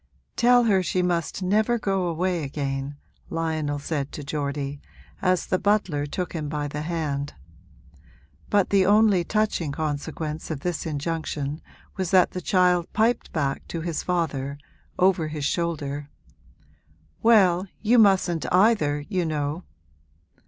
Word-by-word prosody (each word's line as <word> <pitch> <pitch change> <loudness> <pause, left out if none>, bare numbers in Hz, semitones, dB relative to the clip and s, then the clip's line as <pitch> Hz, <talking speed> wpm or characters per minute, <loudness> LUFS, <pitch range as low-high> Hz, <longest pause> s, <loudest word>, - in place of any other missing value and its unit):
'Tell 245 0 +5
her 200 -5 +3
she 180 +1 0
must 175 0 -1
never 215 +5 +2
go 195 -4 0
away 175 +1 -1
again,' 140 0 -4 0.3
Lionel 160 -3 -1
said 145 -1 -3
to 150 - -6
Geordie, 140 -1 -3 0.4
as 185 -2 +2
the 185 - 0
butler 185 -8 +1
took 180 +4 -4
him 155 -3 -3
by 150 -1 -2
the 150 +1 -5
hand; 150 -3 -3 1.1
but 205 -2 +2
the 195 -1 +5
only 205 -2 +4
touching 210 -6 0
consequence 155 +1 -4
of 155 -4 -4
this 175 -1 -2
injunction 150 -1 -3 0.4
was 190 -3 -1
that 185 -1 +4
the 180 - -5
child 180 -2 +2
piped 225 +3 +1
back 140 -4 -2
to 165 - -4
his 165 -1 -2
father, 145 -6 -2 0.4
over 180 -3 +3
his 150 -2 -4
shoulder, 145 -4 -2 1.1
'Well, 195 -5 +4
you 230 +3 +4
mustn't 185 - +3
either, 180 -7 +3
you 185 -4 0
know!' 155 +1 -2
165 Hz, 135 wpm, -25 LUFS, 145-185 Hz, 1.1 s, Tell